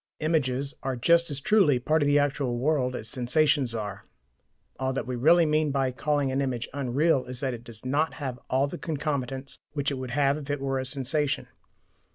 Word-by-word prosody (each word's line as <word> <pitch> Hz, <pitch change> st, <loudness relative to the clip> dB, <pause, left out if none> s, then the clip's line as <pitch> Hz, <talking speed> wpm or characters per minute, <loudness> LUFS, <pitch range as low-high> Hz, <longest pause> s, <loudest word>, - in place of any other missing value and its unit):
Images 140 Hz, -4 st, 0 dB
are 135 Hz, -1 st, -2 dB
just 170 Hz, +7 st, +3 dB
as 145 Hz, -2 st, -3 dB
truly 190 Hz, -6 st, +4 dB
part 155 Hz, +6 st, +1 dB
of 145 Hz, -, +2 dB
the 145 Hz, 0 st, +4 dB
actual 140 Hz, -4 st, 0 dB
world 130 Hz, -1 st, +1 dB
as 110 Hz, -, -5 dB
sensations 130 Hz, 0 st, +2 dB
are. 105 Hz, -2 st, -5 dB, 0.8 s
All 130 Hz, 0 st, 0 dB
that 135 Hz, -, -2 dB
we 125 Hz, -, -3 dB
really 165 Hz, +7 st, +5 dB
mean 155 Hz, 0 st, +2 dB
by 135 Hz, -2 st, 0 dB
calling 145 Hz, +1 st, 0 dB
an 135 Hz, +1 st, 0 dB
image 125 Hz, -4 st, -2 dB
"unreal" 140 Hz, +1 st, +1 dB
is 125 Hz, 0 st, -6 dB
that 135 Hz, -2 st, -1 dB
it 120 Hz, -1 st, -8 dB
does 115 Hz, -1 st, -10 dB
not 145 Hz, +5 st, 0 dB
have 130 Hz, -4 st, -5 dB, 0.3 s
the -, -, -6 dB
concomitants 140 Hz, -4 st, -3 dB
which 145 Hz, -1 st, -1 dB
it 135 Hz, -, -3 dB
would 130 Hz, -1 st, -5 dB
have 140 Hz, +2 st, +2 dB
if 145 Hz, -1 st, -10 dB
it 145 Hz, 0 st, -1 dB
were 135 Hz, -1 st, -1 dB
a 130 Hz, -, -3 dB
sensation. 140 Hz, +2 st, -1 dB
135 Hz, 200 wpm, -27 LUFS, 125-150 Hz, 0.8 s, really